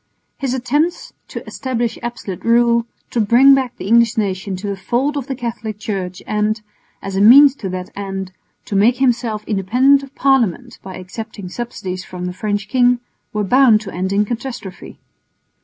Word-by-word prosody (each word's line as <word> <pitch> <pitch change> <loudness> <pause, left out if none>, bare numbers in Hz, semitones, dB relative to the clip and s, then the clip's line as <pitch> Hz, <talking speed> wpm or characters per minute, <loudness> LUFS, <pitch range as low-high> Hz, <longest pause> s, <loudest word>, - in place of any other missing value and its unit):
His 265 -2 -1
attempts 290 +7 -1
to - - -8
establish 240 -3 -3
absolute 235 -6 -6
rule, 235 0 +3 0.2
to 235 - +1
bring 245 +6 +6
back 260 -2 0
the - - -7
English 235 +2 +3
nation 195 -2 -2
to 185 +3 -7
the 200 -1 -2
fold 250 +9 -1
of 280 -3 -4
the 270 - -3
Catholic 225 -4 -5
Church 190 -4 -5
and, 215 +1 0 0.4
as 195 -1 -5
a 195 - +1
means 270 +6 +8
to 195 - -5
that 185 0 -6
end, 195 -2 -5 0.3
to 205 - -4
make 225 +5 +4
himself 235 -4 0
independent 250 +8 +3
of 275 0 -13
Parliament 250 -3 +1
by 190 -1 -9
accepting 195 +1 -8
subsidies 185 -5 -5
from 180 -1 -7
the 180 - -4
French 205 +1 -3
king, 245 +2 +3 0.3
were 210 -1 -1
bound 245 +1 +5
to 200 -3 -8
end 185 +2 -2
in 205 +1 +2
catastrophe. 235 -4 -7
225 Hz, 175 wpm, -18 LUFS, 195-250 Hz, 0.4 s, means